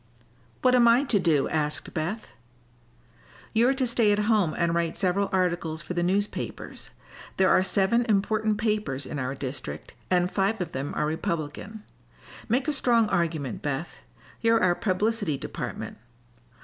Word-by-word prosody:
"What 255 -1 +5
am 245 -2 +6
I 235 +4 +5
to 245 -7 +2
do?" 160 -6 +2
asked 150 -1 -2
Beth. 180 +7 -3 1.2
"You're 240 +4 +4
to 265 -1 +1
stay 230 -3 +3
at 205 - +3
home 210 -7 +2
and 170 -1 +1
write 170 -1 -1
several 195 +1 +1
articles 175 -4 -1
for - - -5
the 175 - -1
newspapers. 195 +4 -2 0.5
There 190 0 +4
are - - +5
seven 200 +5 +2
important 215 +1 +1
papers 210 - -1
in 145 - -5
our 130 +1 -2
district, 135 0 -6 0.2
and 180 0 +2
five 200 +3 0
of 180 - -3
them 135 +2 -4
are 150 - 0
Republican. 170 +5 -4 0.7
Make 250 +5 +1
a 300 - +1
strong 235 -5 +2
argument, 160 - -1
Beth. 145 +3 -4 0.4
You're 230 -2 +3
our 180 -1 +4
publicity 205 -3 0
department. - - -6
190 Hz, 150 wpm, -26 LUFS, 160-220 Hz, 1.2 s, am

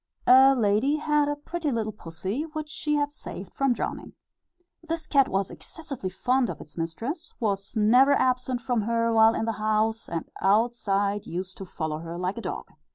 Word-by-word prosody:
A 265 +2 +7
lady 225 +5 +2
had 300 -1 +1
a 290 - 0
pretty 305 +1 -3
little 220 -3 -1
pussy, 190 - -5
which 310 -1 -4
she 305 -2 -1
had 290 0 0
saved 190 - -9
from 275 -1 +1
drowning. 240 - -3 0.7
This 330 -1 -4
cat 275 -3 +3
was 195 0 -1
excessively 275 - -7
fond 250 +6 +1
of - - -5
its 150 - -13
mistress, 230 - -4
was 200 -2 -2
never 245 +6 +5
absent 255 -2 +1
from 240 -2 0
her 230 +1 +1
while 225 0 +6
in 225 - -1
the 225 - 0
house, 215 +1 0
and 165 -1 -3
outside 205 -1 +1
used 185 +2 -5
to 195 - -7
follow 155 -3 -4
her 165 +1 -6
like 185 +5 -2
a - - -6
dog. - - -5
230 Hz, 180 wpm, -26 LUFS, 195-275 Hz, 0.7 s, A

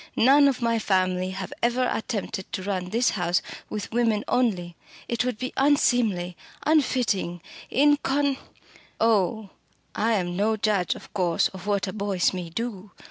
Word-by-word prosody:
"None 280 +4 +6
of 260 -3 0
my 230 -1 +2
family 185 -2 +1
have 190 +9 -6
ever 245 +2 +2
attempted 205 -4 -4
to 190 - -3
run 185 -2 -2
this 235 +5 +2
house 175 -2 0 0.3
with 210 -1 -5
women 225 -3 +1
only. 185 -9 0 0.3
It 235 0 0
would 250 -3 -2
be 255 +3 -4
unseemly 235 -10 +2 0.3
unfitting 250 - +1 0.3
incon 285 -1 +2 0.3
" - - -26
"Oh, 220 -2 +1 0.4
I 225 +2 +1
am 175 -4 -1
no 215 +3 +1
judge 205 -4 +1
of - - -13
course 180 -5 +1
of 190 +1 -10
what 200 -1 +1
a 185 - -4
Boyce 200 -4 0
may 180 -2 -5
do!" 210 +1 -5
215 Hz, 155 wpm, -25 LUFS, 185-245 Hz, 0.4 s, None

